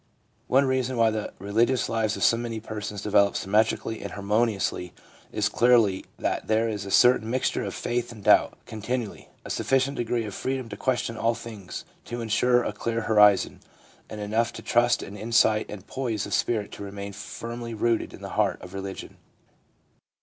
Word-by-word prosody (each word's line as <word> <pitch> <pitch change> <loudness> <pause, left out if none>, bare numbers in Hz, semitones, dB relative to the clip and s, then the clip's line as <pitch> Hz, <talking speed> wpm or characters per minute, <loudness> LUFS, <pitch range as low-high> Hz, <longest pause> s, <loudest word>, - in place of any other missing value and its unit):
One 135 +2 +4
reason 130 -1 0
why 115 -1 +4
the 110 -1 -3
religious 115 +6 +1
lives 110 -1 0
of 115 - +3
many 115 -2 -4
persons 105 -2 -6
develop 100 -1 +3
symmetrically 110 +2 +1
and - - -6
harmoniously 100 -3 0 0.4
is 105 -1 +1
clearly 110 -3 +3
that - - -2
there 110 +1 +2
is 105 -3 -4
a - - -5
certain 120 +1 +5
mixture 130 +2 0
of - - -4
faith 120 0 -2
and 110 -3 -11
doubt - - +4
continually 110 +1 -4
— - - -36
a - - -5
sufficient 135 +1 +1
degree 120 -1 -1
of 105 - -6
freedom 130 0 -3
to 100 - -6
question 120 0 -1
all 115 +1 +1
things 105 -7 -8 0.2
to 120 +2 -5
insure 120 +2 +2
a - - -3
clear 115 0 -2
horizon, 105 -3 +4 0.5
and 110 - -7
enough 110 +3 0
trust 120 0 +2
and 100 +1 -9
insight 110 -1 +3
and 100 -2 -8
poise 115 -6 -2
of 100 - -5
spirit 110 -4 0
to - - -8
remain 100 0 -6
firmly 115 +3 -6
rooted 115 +1 0
in - - -12
the - - -5
heart - - +1
of - - -10
religion. 95 0 -7
110 Hz, 175 wpm, -26 LUFS, 105-120 Hz, 0.5 s, certain